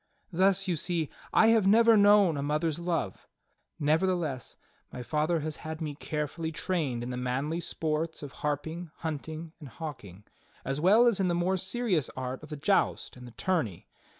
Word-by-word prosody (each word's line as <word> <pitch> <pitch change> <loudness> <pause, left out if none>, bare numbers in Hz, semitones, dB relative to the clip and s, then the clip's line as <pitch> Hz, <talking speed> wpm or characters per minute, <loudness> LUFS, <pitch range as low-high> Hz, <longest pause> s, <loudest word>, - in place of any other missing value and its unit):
Thus 195 +2 +3
you 180 - +1
see 165 -1 -1 0.2
I 220 - +5
have 225 -4 +4
never 230 +2 +6
known 205 -4 +6
a 140 - -2
mother's 150 +2 -1
love; 170 - -3 0.5
nevertheless 155 -3 0 0.3
my 125 - -6
father 155 +4 0
has 155 0 -4
had 155 0 -6
me 155 -3 -3
carefully 150 +2 -4
trained 155 -8 -2
in 125 - -4
the 125 - -4
manly 135 +6 -1
sports 160 -1 -2
of 140 - -7
harping, 160 +4 -3
hunting 160 +1 -5
and 145 -5 -10
hawking, 115 - -8 0.4
as 135 +2 -2
well 210 +8 +6
as 230 -5 +3
in 190 - +2
the 175 - +1
more 175 +2 +1
serious 190 - -1
art 130 0 -4
of 155 - -12
the 150 - -5
joust 190 +8 +1
and 125 -1 -11
the - - -11
tourney. 155 - -1
160 Hz, 175 wpm, -29 LUFS, 145-180 Hz, 0.5 s, never